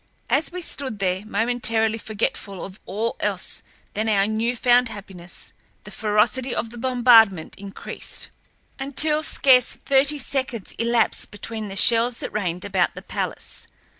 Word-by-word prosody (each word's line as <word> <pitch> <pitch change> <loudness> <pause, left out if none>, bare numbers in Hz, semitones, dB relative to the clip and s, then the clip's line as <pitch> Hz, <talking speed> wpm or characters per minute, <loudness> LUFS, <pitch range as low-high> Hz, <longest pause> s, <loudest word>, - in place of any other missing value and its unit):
As 300 +3 +2
we 360 +1 -5
stood 265 -8 -4
there, 190 -1 -1
momentarily 225 0 +1
forgetful 205 -3 -4
of 190 +1 -12
all 220 +4 -2
else - - -2 0.3
than 220 +1 -1
our 200 -2 +3
new 220 +3 -1
found 245 0 +3
happiness, 190 -4 -10 0.3
the - - -11
ferocity 220 +4 0
of 225 - -3
the 240 - -10
bombardment 230 -8 +4
increased 200 0 -7 0.5
until 300 +3 +1
scarce 260 -5 +4
thirty 280 +2 +2
seconds 260 -6 -2
elapsed 235 0 +1
between 215 +1 -6
the 195 - -7
shells 230 +3 +5
that - - -6
rained 180 -4 -2
about 190 -3 0
the - - -9
palace. - - -5
225 Hz, 140 wpm, -23 LUFS, 200-250 Hz, 0.5 s, shells